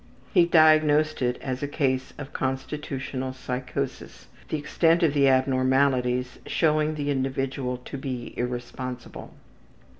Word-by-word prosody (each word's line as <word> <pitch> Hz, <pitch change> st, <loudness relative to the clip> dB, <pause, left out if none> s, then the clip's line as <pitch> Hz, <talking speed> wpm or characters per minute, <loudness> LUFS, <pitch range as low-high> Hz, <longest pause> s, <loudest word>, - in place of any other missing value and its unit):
He 170 Hz, -1 st, +5 dB
diagnosed 155 Hz, -2 st, +4 dB
it 125 Hz, -1 st, +1 dB
as 130 Hz, -1 st, -3 dB
a 145 Hz, -, -1 dB
case 130 Hz, -3 st, -1 dB
of 145 Hz, 0 st, -8 dB
constitutional 130 Hz, -1 st, -3 dB
psychosis; 125 Hz, 0 st, -5 dB, 0.2 s
the 155 Hz, -, -1 dB
extent 165 Hz, +3 st, +2 dB
of 155 Hz, -4 st, +3 dB
the 140 Hz, -2 st, +4 dB
abnormalities 130 Hz, -1 st, +2 dB
showing 155 Hz, -1 st, +1 dB
the 145 Hz, -1 st, -1 dB
individual 135 Hz, -1 st, -2 dB
to 140 Hz, -, -6 dB
be 130 Hz, -3 st, -5 dB
irresponsible. 125 Hz, 0 st, -5 dB
135 Hz, 120 wpm, -26 LUFS, 130-150 Hz, 0.2 s, He